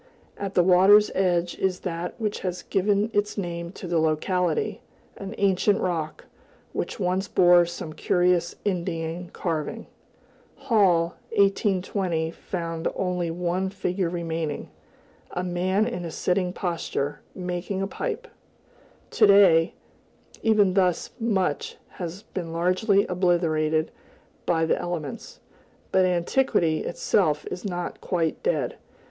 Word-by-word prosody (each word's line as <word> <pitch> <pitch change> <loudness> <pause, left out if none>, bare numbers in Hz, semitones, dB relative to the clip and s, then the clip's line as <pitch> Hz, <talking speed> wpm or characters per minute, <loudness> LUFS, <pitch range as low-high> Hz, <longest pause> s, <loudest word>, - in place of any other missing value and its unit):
At 200 -1 -5
the 180 - +5
water's 190 +4 +6
edge 175 -2 +1
is 190 -1 0
that 175 +3 -4
which 210 -2 -2
has 180 -1 -4
given 205 +3 +1
its 205 +1 0
name 170 -3 -4
to 190 - -8
the 170 -1 +1
locality, 180 - 0 0.4
an 195 +2 -7
ancient 200 +1 +2
rock, 160 -4 -3 0.5
which - - -3
once 185 +1 0
bore 175 -1 +5
some 165 -2 -6
curious 175 0 +1
Indian 170 -2 -2
carving. 160 -4 -3 0.7
Hall 180 -7 +2 0.2
(1820) 190 -4 +1
found 165 -2 -4
only 180 -2 -1
one 180 +3 -1
figure 185 -2 -2
remaining, 165 -3 -3 0.6
"a 180 - -3
man 185 +3 +1
in 235 -7 -3
a 170 - -4
sitting 180 +2 0
posture, 165 -5 -3 0.2
making 180 +1 -3
a - - +1
pipe;" - - -4 0.8
to 215 - +5
day, 185 -5 +6 0.7
even 210 -4 +4
thus 180 -3 +1
much 190 -10 -1
has 180 +3 -7
been 170 -3 -6
largely 185 +4 +2
obliterated 165 -4 +1 0.6
by 165 -1 +2
the - - +1
elements. 165 -6 -5 0.5
But 190 -1 +4
Antiquity 175 -2 +1
itself 160 -4 0
is 180 - -5
not 175 -4 -4
quite 165 -3 -1
dead. - - -1
180 Hz, 120 wpm, -25 LUFS, 170-195 Hz, 0.8 s, water's